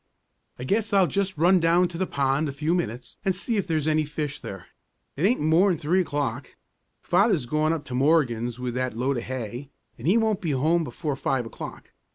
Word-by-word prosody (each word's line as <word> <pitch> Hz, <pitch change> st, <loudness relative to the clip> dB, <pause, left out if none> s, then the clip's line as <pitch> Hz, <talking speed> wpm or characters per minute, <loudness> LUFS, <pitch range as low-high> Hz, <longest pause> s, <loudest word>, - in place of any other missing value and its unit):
"I 125 Hz, -, -6 dB
guess 205 Hz, -, 0 dB
I'll 195 Hz, -2 st, +5 dB
just 190 Hz, +2 st, -1 dB
run 180 Hz, +4 st, +5 dB
down 170 Hz, +2 st, +3 dB
to 170 Hz, -, -7 dB
the 190 Hz, -, 0 dB
pond 140 Hz, +2 st, 0 dB
a -, -, -5 dB
few 155 Hz, +4 st, -1 dB
minutes, 125 Hz, -8 st, -3 dB
and 190 Hz, -3 st, +1 dB
see 230 Hz, -3 st, -2 dB
if 195 Hz, -, -1 dB
there's 155 Hz, -3 st, 0 dB
any 155 Hz, 0 st, +2 dB
fish 150 Hz, -1 st, -4 dB
there. 95 Hz, -2 st, -8 dB, 0.5 s
It 160 Hz, +8 st, +2 dB
aint 245 Hz, -, +2 dB
more'n 165 Hz, +4 st, +3 dB
three 170 Hz, +6 st, +2 dB
o'clock; 145 Hz, -6 st, -3 dB, 0.5 s
Father's 185 Hz, -, +2 dB
gone 155 Hz, +5 st, +1 dB
up 165 Hz, -3 st, -3 dB
to 130 Hz, -, -7 dB
Morgan's 125 Hz, -4 st, +1 dB
with 125 Hz, -1 st, -3 dB
that 125 Hz, -2 st, -2 dB
load 130 Hz, +2 st, 0 dB
of 120 Hz, -, -3 dB
hay, 130 Hz, +1 st, -5 dB, 0.3 s
and -, -, -5 dB
he 195 Hz, +6 st, +5 dB
won't 220 Hz, -3 st, +1 dB
be 165 Hz, -6 st, -1 dB
home 160 Hz, +6 st, +2 dB
before 150 Hz, -1 st, -4 dB
five 135 Hz, -2 st, -1 dB
o'clock. 115 Hz, -, -9 dB
155 Hz, 205 wpm, -25 LUFS, 130-180 Hz, 0.5 s, I'll